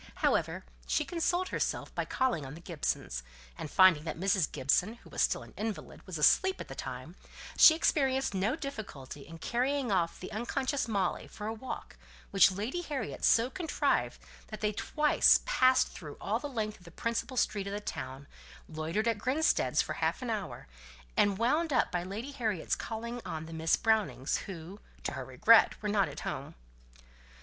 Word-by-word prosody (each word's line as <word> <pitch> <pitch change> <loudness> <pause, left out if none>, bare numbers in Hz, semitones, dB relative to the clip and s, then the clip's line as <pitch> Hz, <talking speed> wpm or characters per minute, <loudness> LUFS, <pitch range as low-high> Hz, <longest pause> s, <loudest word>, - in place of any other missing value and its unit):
However, - - 0 0.2
she - - +1
consoled 350 +2 0
herself - - -2
by - - -2
calling 250 - 0
on 135 +2 -8
the - - -10
Gibsons; 150 - -3 0.3
and, 150 - -6
finding 185 -3 +6
that 160 - -4
Mrs. 190 -3 +1
Gibson 180 - +1
(who - - -18
was - - -1
still - - +1
an - - -15
invalid) 215 -1 -5
was 185 -3 -4
asleep 375 - +4
at - - -7
the - - -6
time, - - -7 0.4
she 315 - +9
experienced 270 -6 +1
no 195 +7 +1
difficulty 205 - -7
in 165 - -10
carrying 255 - 0
off 175 -3 0
the 185 - -7
unconscious 255 +5 -1
Molly 200 -5 -1
for 210 - -8
a 220 - -2
walk, 240 +4 -7 0.3
which 195 -1 +6
Lady 215 - -3
Harriet 290 -6 -5
so 230 +1 +5
contrived 345 -4 0 0.3
that 215 - -7
they 210 -1 +1
twice 300 +7 +4
passed 260 - +4
through 150 -3 -9
all 220 +3 -1
the 290 - -5
length 215 -5 -3
of 180 - -19
the - - -10
principal 230 +7 -3
street 200 -4 0
of 200 - -4
the 205 - -2
town, 130 -8 -6 0.4
loitered 160 +8 -2
at 225 -3 +1
Grinstead's 280 +8 +2
for - - -4
half - - -1
an 240 - -2
hour, 200 - -4 0.5
and 200 -2 +3
wound 295 +9 +1
up 255 - +2
by 175 - 0
Lady 205 +9 -5
Harriet's 220 - -1
calling 235 +2 -5
on 160 -4 -5
the 165 - -9
Miss 160 0 +2
Brownings, 215 - +1
who, 185 +1 -8 0.2
to - - -2
her - - -5
regret, - - +5
were 210 - -1
not 205 -2 +2
at - - -8
home. - - -5
215 Hz, 180 wpm, -31 LUFS, 175-255 Hz, 0.5 s, she